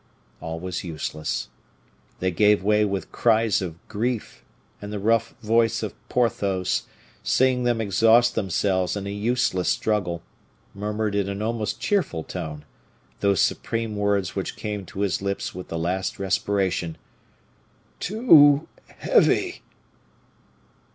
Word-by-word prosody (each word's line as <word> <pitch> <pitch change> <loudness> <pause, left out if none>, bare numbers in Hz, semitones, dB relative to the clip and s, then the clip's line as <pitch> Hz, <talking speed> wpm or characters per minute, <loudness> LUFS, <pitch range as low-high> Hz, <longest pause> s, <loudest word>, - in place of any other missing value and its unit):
All 80 0 -5
was 90 0 -4
useless. 75 -2 -4 0.7
They 95 0 +1
gave 105 +2 +3
way 105 +1 +3
with 100 -2 -3
cries 110 -3 +2
of 85 -3 -5
grief, 115 +2 -3 0.4
and 105 0 -7
the 105 - -3
rough 115 +2 +1
voice 115 0 +2
of 110 - -3 0.2
Porthos, 100 -6 0 0.3
seeing 130 -1 +2
them 120 -2 +1
exhaust 115 +3 +4
themselves 95 -2 0
in 100 - -5
a 100 - -4
useless 105 -3 0
struggle, 90 -6 0 0.5
murmured 105 +1 -2
in 100 -1 0
an 100 +1 -3
almost 110 -1 -2
cheerful 185 - 0
tone 75 -2 -6 0.5
those 100 -2 +2
supreme 115 -2 -1
words 100 -3 0
which 95 - -3
came 105 -3 -5
to 100 - -6
his 100 -2 0
lips 100 0 -3
with 90 0 -8
the 85 - -4
last 90 +3 -2
respiration, 95 -3 -1 1.0
"Too 160 - +5 0.2
heavy!" - - +2
100 Hz, 125 wpm, -24 LUFS, 95-115 Hz, 1.0 s, Too